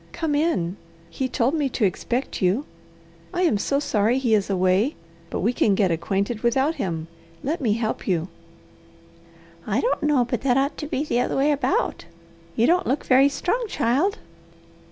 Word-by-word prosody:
"Come 320 Hz, -3 st, -2 dB
in. 290 Hz, -, 0 dB, 0.3 s
He 260 Hz, -1 st, -2 dB
told 250 Hz, +4 st, +1 dB
me 295 Hz, -4 st, 0 dB
to 235 Hz, -3 st, 0 dB
expect 240 Hz, +7 st, -2 dB
you. 195 Hz, +10 st, +1 dB, 0.7 s
I 360 Hz, -, +1 dB
am 230 Hz, -, +2 dB
so 275 Hz, +7 st, 0 dB
sorry 225 Hz, -3 st, +1 dB
he 250 Hz, -4 st, +1 dB
is 205 Hz, -2 st, +2 dB
away, 190 Hz, +7 st, +2 dB, 0.3 s
but -, -, -3 dB
we 225 Hz, +7 st, +1 dB
can 205 Hz, -4 st, +2 dB
get 190 Hz, -3 st, +2 dB
acquainted 200 Hz, +6 st, -1 dB
without 265 Hz, +6 st, +2 dB
him. 165 Hz, -, -3 dB, 0.4 s
Let 310 Hz, +4 st, -2 dB
me 225 Hz, -5 st, +2 dB
help 220 Hz, 0 st, -3 dB
you." 175 Hz, -3 st, 0 dB, 1.4 s
"I 215 Hz, +2 st, +1 dB
don't 485 Hz, -, 0 dB
know 290 Hz, -5 st, +2 dB
but 245 Hz, -1 st, -3 dB
that 255 Hz, -2 st, +2 dB
ought 275 Hz, +2 st, +1 dB
to 300 Hz, -, -5 dB
be 285 Hz, -1 st, -1 dB
the 245 Hz, -5 st, 0 dB
other 250 Hz, -, 0 dB
way 280 Hz, +2 st, +3 dB
about. 275 Hz, -, 0 dB, 0.5 s
You 230 Hz, -, +3 dB
don't 355 Hz, +5 st, +2 dB
look 270 Hz, +4 st, -1 dB
very 270 Hz, +2 st, +5 dB
strong, 365 Hz, -, -1 dB
child." 315 Hz, -, +1 dB
250 Hz, 175 wpm, -23 LUFS, 205-290 Hz, 1.4 s, very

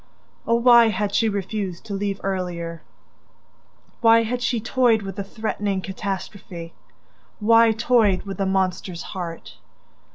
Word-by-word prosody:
Oh, 230 Hz, -, +3 dB
why 235 Hz, -1 st, +6 dB
had 205 Hz, -1 st, -1 dB
she 225 Hz, -, +2 dB
refused 200 Hz, -2 st, -4 dB
to 210 Hz, -, -6 dB
leave 200 Hz, 0 st, -2 dB
earlier? 175 Hz, -4 st, -3 dB, 1.2 s
Why 230 Hz, 0 st, +5 dB
had 245 Hz, +2 st, -3 dB
she 240 Hz, -1 st, 0 dB
toyed 230 Hz, -1 st, +2 dB
with 195 Hz, -1 st, -6 dB
the 200 Hz, -, -2 dB
threatening 205 Hz, -1 st, -3 dB
catastrophe? 190 Hz, -3 st, -6 dB, 0.7 s
Why 230 Hz, +1 st, +5 dB
toyed 220 Hz, -4 st, +2 dB
with 195 Hz, -1 st, -7 dB
the 195 Hz, -, 0 dB
monster's 185 Hz, -2 st, -1 dB
heart? 170 Hz, -3 st, -7 dB
200 Hz, 130 wpm, -23 LUFS, 190-225 Hz, 1.2 s, why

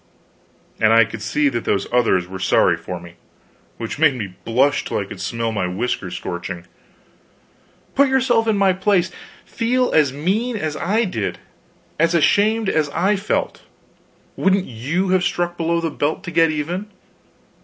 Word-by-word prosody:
And 110 Hz, 0 st, +4 dB
I 115 Hz, -1 st, +6 dB
could 110 Hz, -1 st, -8 dB
see 145 Hz, +7 st, +1 dB
that 120 Hz, -3 st, -3 dB
those 100 Hz, -, 0 dB
others 115 Hz, -7 st, +3 dB
were 95 Hz, 0 st, -7 dB
sorry -, -, +3 dB
for 90 Hz, -1 st, -7 dB
me 85 Hz, 0 st, -14 dB, 0.6 s
which 115 Hz, +4 st, -5 dB
made 155 Hz, -4 st, +4 dB
me 100 Hz, -7 st, -5 dB
blush 135 Hz, +5 st, +2 dB
till -, -, -3 dB
I 100 Hz, -, -2 dB
could 95 Hz, -1 st, -9 dB
smell 115 Hz, +3 st, -2 dB
my 100 Hz, -4 st, -1 dB
whiskers 95 Hz, 0 st, -3 dB
scorching. 90 Hz, 0 st, -6 dB, 1.3 s
Put 280 Hz, 0 st, +4 dB
yourself 245 Hz, -4 st, +2 dB
in 215 Hz, -2 st, +2 dB
my 195 Hz, -1 st, +4 dB
place; 185 Hz, -1 st, +1 dB, 0.3 s
feel 250 Hz, +2 st, 0 dB
as 150 Hz, -4 st, +3 dB
mean 205 Hz, -, -1 dB
as 155 Hz, -6 st, -3 dB
I 210 Hz, +9 st, +1 dB
did, 110 Hz, -, -3 dB, 0.6 s
as 165 Hz, +2 st, +3 dB
ashamed 210 Hz, +7 st, +3 dB
as 155 Hz, -5 st, +1 dB
I 190 Hz, +8 st, +1 dB
felt 200 Hz, +2 st, -2 dB, 0.7 s
wouldn't 195 Hz, 0 st, +2 dB
you 145 Hz, +12 st, -2 dB
have 185 Hz, -1 st, +3 dB
struck 175 Hz, 0 st, -1 dB
below 170 Hz, 0 st, 0 dB
the 165 Hz, -1 st, -2 dB
belt 150 Hz, +6 st, -2 dB
to 170 Hz, -, -6 dB
get 165 Hz, 0 st, +4 dB
even? 170 Hz, +7 st, -3 dB
160 Hz, 165 wpm, -20 LUFS, -, 1.3 s, I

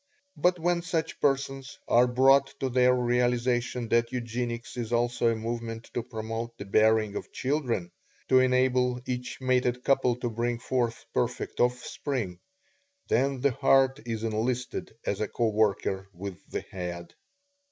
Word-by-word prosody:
But 180 Hz, 0 st, +2 dB
when 175 Hz, +1 st, +1 dB
such 165 Hz, -2 st, -2 dB
persons 135 Hz, -1 st, 0 dB
are 120 Hz, +1 st, +5 dB
brought 135 Hz, +2 st, +4 dB
to 135 Hz, -, -1 dB
their 125 Hz, 0 st, +4 dB
realization 125 Hz, 0 st, +1 dB
that 115 Hz, 0 st, +2 dB
Eugenics 120 Hz, -1 st, -4 dB
is 120 Hz, -2 st, -4 dB
also 120 Hz, 0 st, +1 dB
a 115 Hz, -, +1 dB
movement 115 Hz, 0 st, -5 dB
to 120 Hz, -, -1 dB
promote 115 Hz, 0 st, -5 dB
the 100 Hz, -, -7 dB
bearing 110 Hz, +1 st, +3 dB
of -, -, -6 dB
children 125 Hz, -, -1 dB, 0.4 s
to 130 Hz, -, +6 dB
enable 125 Hz, -1 st, +2 dB
each 125 Hz, 0 st, -4 dB
mated 125 Hz, -1 st, +1 dB
couple 135 Hz, -3 st, +3 dB
to 120 Hz, 0 st, -3 dB
bring 120 Hz, +1 st, -1 dB
forth 120 Hz, -1 st, -2 dB
perfect -, -, -2 dB
offspring 125 Hz, -5 st, -1 dB, 0.7 s
then 135 Hz, +2 st, +1 dB
the 140 Hz, 0 st, +3 dB
heart 135 Hz, +2 st, +3 dB
is 115 Hz, -1 st, -3 dB
enlisted 120 Hz, +3 st, -2 dB
as 100 Hz, +1 st, -1 dB
a 105 Hz, -, 0 dB
co 115 Hz, +1 st, 0 dB
worker 100 Hz, -2 st, 0 dB
with 95 Hz, +1 st, -8 dB
the -, -, -3 dB
head. 85 Hz, -2 st, -7 dB
120 Hz, 145 wpm, -28 LUFS, 115-130 Hz, 0.7 s, to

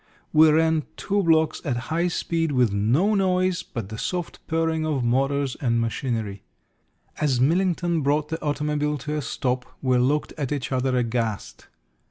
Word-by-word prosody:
We 155 Hz, +1 st, +7 dB
ran 160 Hz, 0 st, +2 dB
two 200 Hz, 0 st, 0 dB
blocks 160 Hz, -3 st, +2 dB
at 130 Hz, -6 st, -1 dB, 0.2 s
high 170 Hz, +2 st, +2 dB
speed, 165 Hz, -2 st, -1 dB
with 125 Hz, -5 st, +2 dB
no 125 Hz, -, +2 dB
noise 185 Hz, -2 st, +1 dB
but 110 Hz, -5 st, -7 dB
the 110 Hz, 0 st, -6 dB
soft 180 Hz, -2 st, -3 dB
purring 160 Hz, 0 st, 0 dB
of 150 Hz, -5 st, -1 dB
motors 135 Hz, +2 st, +1 dB
and 115 Hz, -4 st, +1 dB
machinery. 115 Hz, -4 st, -2 dB, 0.8 s
As 140 Hz, -5 st, +1 dB
Millington 170 Hz, +3 st, +1 dB
brought 145 Hz, +2 st, +1 dB
the 160 Hz, 0 st, -4 dB
automobile 150 Hz, 0 st, -1 dB
to 150 Hz, +3 st, -4 dB
a -, -, -1 dB
stop 125 Hz, -1 st, -2 dB, 0.2 s
we 130 Hz, -2 st, +2 dB
looked 145 Hz, +5 st, +1 dB
at 140 Hz, -2 st, -2 dB
each 135 Hz, -6 st, -3 dB
other 130 Hz, 0 st, +1 dB
aghast. 115 Hz, -3 st, -2 dB
145 Hz, 160 wpm, -24 LUFS, 125-160 Hz, 0.8 s, We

